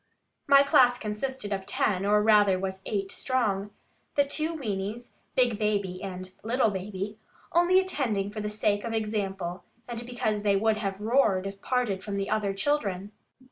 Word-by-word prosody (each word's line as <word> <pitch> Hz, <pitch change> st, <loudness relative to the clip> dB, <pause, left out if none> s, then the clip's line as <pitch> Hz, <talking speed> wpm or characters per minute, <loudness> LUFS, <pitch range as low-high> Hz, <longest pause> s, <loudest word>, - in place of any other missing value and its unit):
My 275 Hz, 0 st, +7 dB
class 250 Hz, -3 st, +5 dB
consisted 210 Hz, 0 st, -3 dB
of 195 Hz, -1 st, -4 dB
ten, 195 Hz, -1 st, 0 dB
or 210 Hz, 0 st, +4 dB
rather 205 Hz, -3 st, +5 dB
was 190 Hz, 0 st, -4 dB
eight 195 Hz, -2 st, -2 dB
strong, 210 Hz, -6 st, 0 dB, 0.5 s
the 285 Hz, -, +4 dB
two 310 Hz, +3 st, 0 dB
weames 225 Hz, -5 st, -4 dB, 0.2 s
(big 240 Hz, -4 st, +2 dB
baby 200 Hz, -4 st, -1 dB
and 185 Hz, -1 st, -6 dB
little 230 Hz, 0 st, +1 dB
baby), 200 Hz, +2 st, -5 dB, 0.3 s
only 350 Hz, +2 st, +5 dB
attending 240 Hz, -, -1 dB
for 215 Hz, 0 st, -5 dB
the 210 Hz, -, -2 dB
sake 210 Hz, -1 st, 0 dB
of 230 Hz, -, -3 dB
example, 195 Hz, -5 st, -2 dB, 0.2 s
and 240 Hz, -1 st, -5 dB
because 220 Hz, -4 st, -1 dB
they 205 Hz, -1 st, +2 dB
would 215 Hz, +2 st, +2 dB
have 195 Hz, -2 st, -3 dB
roared, 215 Hz, -5 st, +2 dB
if 195 Hz, 0 st, -6 dB
parted 245 Hz, -7 st, 0 dB
from 200 Hz, -2 st, -4 dB
the 195 Hz, +1 st, -2 dB
other 210 Hz, -2 st, +1 dB
children. 200 Hz, -4 st, -1 dB
210 Hz, 165 wpm, -28 LUFS, 195-240 Hz, 0.5 s, My